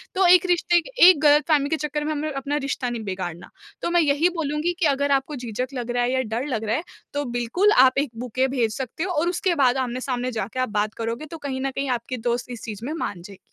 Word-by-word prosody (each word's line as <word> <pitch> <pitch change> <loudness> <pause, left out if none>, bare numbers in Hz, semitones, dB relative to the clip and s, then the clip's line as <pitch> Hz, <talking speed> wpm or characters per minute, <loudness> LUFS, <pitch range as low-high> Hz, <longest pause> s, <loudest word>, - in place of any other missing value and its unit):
तो 380 0 +3
एक 360 0 +6
रिश्ते 345 -1 +3
क 330 - -12
एक 355 -3 +9
ग़लतफ़हमी 295 -1 +4
के 320 - +1
चक्कर 300 0 -3
में 310 - -1
हमें 305 0 -2
अपना 275 +1 -3
रिश्ता 275 -3 -2
नहीं 235 -2 -4
बिगाड़ना, 180 -3 -5 0.3
तो - - -1
मैं 345 0 +4
यही 300 +3 +3
बोलूँगी 300 +3 -1
कि 345 - +2
अगर 280 -1 +1
आपको 275 +2 0
झिझक 245 -1 -4
लग 245 -2 -4
रहा 245 0 +1
है 245 - 0
या 260 - +2
डर 230 +1 -3
लग 230 -6 -2
रहा 220 +1 0
है, 315 - -2 0.3
तो 290 0 -2
बिल्कुल 245 - +1
आप 260 +1 +2
एक 280 0 +1
बुके 250 +2 0
भेज 240 -5 -1
सकते 265 +4 -4
हो 375 - -2
और 340 0 +1
उसके 355 0 0
बाद 265 -4 +3
आमने-सामने 255 0 -2
जाके 225 +2 -4
आप 255 - 0
बात 210 0 -1
करोगे 230 +5 -4
तो 325 +2 -9
कहीं 270 -3 -4
न 270 0 -1
कहीं 275 +1 -3
आपके 250 +1 -2
दोस्त 240 +1 -2
इस 240 - -8
चीज़ 220 0 -6
में 295 - -3
मान 205 - -4
जाएगी। 195 +2 -12
265 Hz, 255 wpm, -23 LUFS, 240-300 Hz, 0.3 s, एक